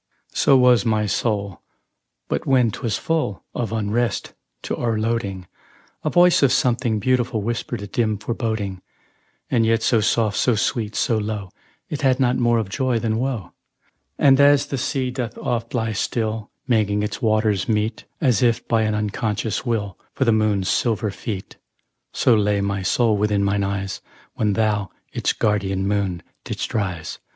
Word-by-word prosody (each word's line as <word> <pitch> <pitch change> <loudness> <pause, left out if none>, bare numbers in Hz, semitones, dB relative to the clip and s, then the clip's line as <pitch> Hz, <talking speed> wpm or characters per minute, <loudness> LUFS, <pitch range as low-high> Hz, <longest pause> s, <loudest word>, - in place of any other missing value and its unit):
So 135 - +4
was 125 -4 +5
my 110 -2 +1
soul; 100 -3 -1 0.7
but - - -2
when 125 -4 +4
'twas 110 0 -2
full 155 -12 -1
Of 115 -3 -3
unrest 115 +2 -1 0.3
to - - -2
o'erloading, 110 -4 -1 0.6
A - - +1
voice 175 0 +5
of 140 -3 +4
something 120 -2 +1
beautiful 120 -1 0
Whispered 120 -1 -3
a - - -4
dim 110 -1 0
foreboding, 110 -4 -3 0.7
And 120 -3 +3
yet 115 0 +2
so 115 - +3
soft, 110 -1 +1
so 125 - +3
sweet, 110 0 -1
so 115 -2 +1
low, 105 -3 -4 0.4
It 150 - -4
had 130 -2 +3
not 125 -1 +2
more 120 -1 +3
of 110 -3 -1
joy 130 +4 0
than 110 -1 -1
woe; 120 -8 -3 0.7
And, 135 -1 +5
as 145 0 +5
the 135 - -4
sea 130 0 -1
doth 125 -2 -4
oft 115 0 -3
lie 115 -2 0
still, 110 0 -2 0.2
Making 105 -4 +2
its 105 0 -4
waters 110 -2 +1
meet, 110 +1 -1
As 125 -9 +2
if 120 -2 +1
by 115 -1 +2
an 110 -1 0
unconscious 105 +2 -2
will, 105 -5 -2 0.2
For 130 - +1
the 115 - +4
moon's 105 -3 +1
silver 110 -3 +1
feet, 100 -1 -6 0.5
So 120 - +3
lay 105 -2 +2
my 100 0 -1
soul 110 +3 +2
within 105 -1 +1
mine 100 0 +1
eyes 100 0 -3 0.3
When 105 -2 0
thou, 105 -2 0 0.2
its - - +1
guardian 100 -2 0
moon, 100 -4 -1 0.2
didst - - -4
rise. 90 -7 -3
110 Hz, 160 wpm, -22 LUFS, 105-120 Hz, 0.7 s, was